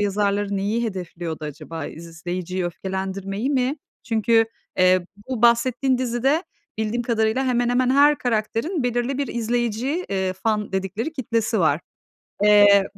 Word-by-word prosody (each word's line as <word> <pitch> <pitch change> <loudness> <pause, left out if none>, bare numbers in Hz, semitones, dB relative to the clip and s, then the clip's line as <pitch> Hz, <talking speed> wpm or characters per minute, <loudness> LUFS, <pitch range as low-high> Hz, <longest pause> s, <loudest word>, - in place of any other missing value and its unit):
yazarları 200 0 0
neyi 215 +5 0
hedefliyordu 175 -6 -5
acaba? 155 +1 -6
İzleyiciyi 175 +2 -5
öfkelendirmeyi 195 +5 -3
mi? 265 +1 +1 0.3
Çünkü, 225 0 +3 0.3
eee, 185 -1 +4 0.2
bu 245 -3 -3
bahsettiğin 245 +2 +3
dizide 260 +7 +1 0.3
bildiğim 220 +2 -1
kadarıyla 230 +2 +1
hemen 245 -1 +1
hemen 250 +1 +2
her 290 +2 +5
karakterin 245 - -1
belirli 245 +2 -1
bir 280 - 0
izleyici, 240 +7 -1
eee, 190 -1 -1
fan 210 +1 -2
dedikleri 195 - -2
kitlesi 230 -5 -1
var. 155 0 +3 0.6
Eee, 205 -1 +7
220 Hz, 125 wpm, -23 LUFS, 190-245 Hz, 0.6 s, Eee